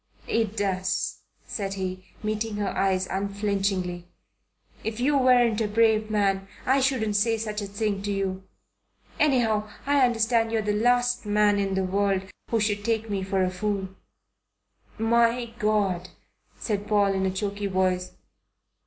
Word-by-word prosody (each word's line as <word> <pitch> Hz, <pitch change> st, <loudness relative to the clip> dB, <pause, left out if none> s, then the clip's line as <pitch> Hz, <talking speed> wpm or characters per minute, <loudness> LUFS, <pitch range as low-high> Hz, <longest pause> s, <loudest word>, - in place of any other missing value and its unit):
"It 225 Hz, -2 st, 0 dB
does," 185 Hz, -2 st, -1 dB, 0.3 s
said 195 Hz, -2 st, -4 dB
he, 185 Hz, -1 st, -4 dB, 0.2 s
meeting 215 Hz, 0 st, -2 dB
her 205 Hz, -1 st, -1 dB
eyes 190 Hz, -1 st, +1 dB
unflinchingly. 195 Hz, -3 st, -1 dB, 0.8 s
"If 220 Hz, +1 st, -4 dB
you 285 Hz, +4 st, +2 dB
weren't 245 Hz, -4 st, +4 dB
a 215 Hz, -, +1 dB
brave 220 Hz, 0 st, +2 dB
man, 195 Hz, -2 st, +1 dB, 0.2 s
I 265 Hz, +2 st, +3 dB
shouldn't 245 Hz, -6 st, +1 dB
say 225 Hz, +2 st, +2 dB
such 215 Hz, -1 st, -3 dB
a 200 Hz, -, -4 dB
thing 200 Hz, 0 st, -2 dB
to 205 Hz, +1 st, -2 dB
you. 190 Hz, -1 st, -2 dB, 0.8 s
Anyhow 225 Hz, -7 st, +2 dB, 0.2 s
I 285 Hz, -1 st, +3 dB
understand 230 Hz, -1 st, +2 dB
you're 225 Hz, -1 st, 0 dB
the 210 Hz, 0 st, 0 dB
last 245 Hz, +1 st, +2 dB
man 205 Hz, 0 st, +3 dB
in 195 Hz, -1 st, 0 dB
the 190 Hz, -, +1 dB
world 195 Hz, 0 st, +1 dB, 0.3 s
who 230 Hz, -, +1 dB
should 205 Hz, -1 st, 0 dB
take 225 Hz, -1 st, -1 dB
me 195 Hz, -1 st, -1 dB
for 190 Hz, 0 st, 0 dB
a 185 Hz, -, 0 dB
fool." 195 Hz, 0 st, -2 dB, 1.1 s
"My 235 Hz, +1 st, +2 dB
God!" 200 Hz, -5 st, +1 dB, 0.5 s
said 205 Hz, -2 st, -3 dB
Paul 205 Hz, -2 st, +3 dB
in 190 Hz, 0 st, 0 dB
a -, -, 0 dB
choky 200 Hz, +1 st, -3 dB
voice. 185 Hz, -1 st, 0 dB
205 Hz, 150 wpm, -26 LUFS, 195-225 Hz, 1.1 s, weren't